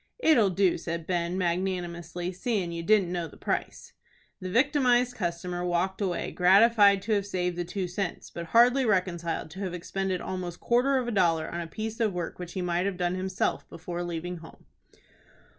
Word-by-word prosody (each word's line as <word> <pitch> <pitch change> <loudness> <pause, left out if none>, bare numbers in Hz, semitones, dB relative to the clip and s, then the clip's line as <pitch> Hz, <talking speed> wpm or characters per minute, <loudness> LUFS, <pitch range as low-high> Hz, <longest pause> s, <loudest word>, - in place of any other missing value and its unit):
"It'll 280 - +4
do," 185 -1 +2
said 165 -1 -4
Ben, 175 0 -1
magnanimously, 175 -1 -2
"seein' 190 -1 -2
you 170 0 -4
didn't 195 -1 +3
know 175 -2 -2
the - - -15
price." - - -4 0.5
The 185 - -5
victimized 250 +1 +3
customer 175 -2 -3
walked 180 +3 -1
away, 185 -3 -1
gratified 200 +1 +5
to 225 - -3
have 200 -2 +1
saved 180 -2 -1
the 175 - -2
two 180 +2 -3
cents, 180 0 -4
but 170 -1 -6
hardly 245 +8 +5
reconciled 175 -7 -1
to 190 - -9
have 185 -3 -3
expended 190 +1 -2
almost 180 -2 -5
quarter 255 +3 +2
of 250 -2 -1
a - - -1
dollar 170 -6 +2
on 170 - -4
a 170 - -5
piece 220 +7 -5
of 220 -4 +1
work 175 -1 -4
which 175 -1 -7
he 185 - -3
might 175 +2 0
have 195 -2 -3
done 175 0 0
himself 185 0 -2
before 175 +1 -5
leaving 175 +1 -4
home. 160 0 -14
180 Hz, 185 wpm, -28 LUFS, 175-200 Hz, 0.5 s, gratified